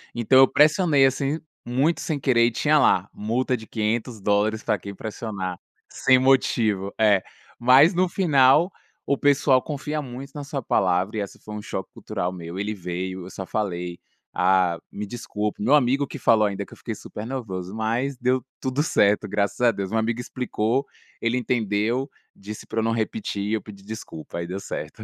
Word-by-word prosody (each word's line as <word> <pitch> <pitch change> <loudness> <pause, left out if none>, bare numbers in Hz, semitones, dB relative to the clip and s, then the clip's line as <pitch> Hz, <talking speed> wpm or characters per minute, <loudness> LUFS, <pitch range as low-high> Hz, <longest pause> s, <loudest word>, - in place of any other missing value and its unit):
Então 120 +3 +4
eu 135 - +8
pressionei 150 -2 +4
assim, 135 +3 0 0.2
muito 135 +7 +1
sem 150 -3 -2
querer, 120 -3 +3
e - - 0
tinha 150 +6 +3
lá 95 -8 +3
“multa 120 +5 -1
de 110 -2 -9
$500 110 -1 0
pra 105 - 0
quem 100 +2 -8
pressionar 100 -5 -5 0.3
sem 130 0 +3
motivo”, 115 -7 +2
é. 105 -3 +4 0.4
Mas 130 - +6
no 180 0 +2
final, 155 -1 +4 0.3
o 140 - +1
pessoal 140 -2 +4
confia 150 +1 -4
muito 135 +1 -8
na 145 -1 -6
sua 140 -1 -4
palavra, 95 +1 +1
e - - 0
esse 100 - -6
foi 105 - -8
um 105 - -5
choque - - -5
cultural 90 +1 -3
meu, 85 0 -7
ele 105 +2 -2
veio, 90 0 -5
eu - - -9
só 95 0 -7
falei: 90 -4 -3 0.3
“Ah, 90 -2 +2
me 105 - -5
desculpa”, 105 -1 -4
meu 130 +8 +4
amigo 140 0 +2
que - - -7
falou 110 -2 +4
ainda 100 0 -4
que - - -15
eu - - -13
fiquei - - -5
super 105 +2 -8
nervoso, 100 -7 -5
mas 120 +5 -1
deu 125 +1 +1 0.2
tudo 130 +2 -1
certo, 105 -8 +2
graças 100 +2 -1
a 120 -1 +5
Deus. 100 -2 -5
Uma 110 - +1
amiga 115 +2 -1
explicou, 125 +1 -1 0.4
ele 115 +2 +1
entendeu, 120 +2 0 0.3
disse 105 +2 -9
pra 115 - -3
eu 110 - +1
não 115 - +1
repetir 110 - -2
e 105 - -2
eu 110 - 0
pedi 100 -2 -13
desculpa, 100 -7 -8
aí 85 - -4
deu 95 +2 -4
certo - - -6
110 Hz, 185 wpm, -24 LUFS, 100-130 Hz, 0.4 s, eu